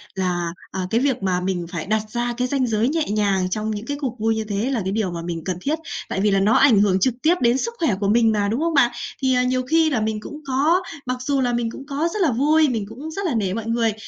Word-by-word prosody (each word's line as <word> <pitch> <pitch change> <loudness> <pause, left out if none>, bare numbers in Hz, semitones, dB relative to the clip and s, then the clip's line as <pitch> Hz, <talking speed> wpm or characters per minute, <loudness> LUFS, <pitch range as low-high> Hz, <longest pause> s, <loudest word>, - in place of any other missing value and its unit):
là, 180 -2 -1 0.2
à, 185 -1 -3
cái 225 - +2
việc 265 -7 0
mà 185 -2 +1
mình 180 -2 -2
phải 170 -4 -4
đặt 215 +2 +1
ra 240 +2 -2
cái 250 0 0
ranh 260 -1 0
giới 220 0 +1
nhẹ 320 +2 0
nhàng 200 -3 +1
trong 215 +3 -2
những 210 +1 -5
cái 285 +3 -3
cuộc 250 -4 -3
vui 225 +1 +1
như 220 - -2
thế 210 +3 -2
là 245 -5 0
cái 190 - -2
điều 205 -3 -1
mà 170 -1 -5
mình 165 -1 -5
cần 185 -2 -2
thiết. 305 +7 -1 0.3
Tại 190 - -1
vì 210 0 +3
là 195 - +3
nó 205 +3 +3
ảnh 255 -7 +5
hưởng 195 -2 +3
trực 250 +6 +2
tiếp 330 +3 +4
đến 240 +1 +3
sức 465 +11 -2
khỏe 285 - +2
của 200 - 0
mình 225 +1 +4
mà, 205 -2 +1
đúng 225 +5 -1
không 335 0 0
bạn? 250 -5 +4 0.3
Thì, 260 -1 +2
à, 250 - +3
nhiều 255 0 +1
khi 320 0 +4
là 265 -7 0
mình 215 0 -1
cũng 300 +8 -9
có 295 +7 +2 0.2
mặc 255 0 -2
dù 275 +1 0
là 245 -1 +1
mình 235 -1 -1
cũng 270 - -9
có 290 +3 -1
rất 425 - -2
là 325 -7 +3
vui, 300 +5 +3
mình 225 -5 -2
cũng 275 +8 -8
rất 395 +5 -4
là 335 - 0
nể 195 -4 0
mọi 225 +1 -4
người, 230 -1 +1
230 Hz, 295 wpm, -22 LUFS, 205-275 Hz, 0.3 s, ảnh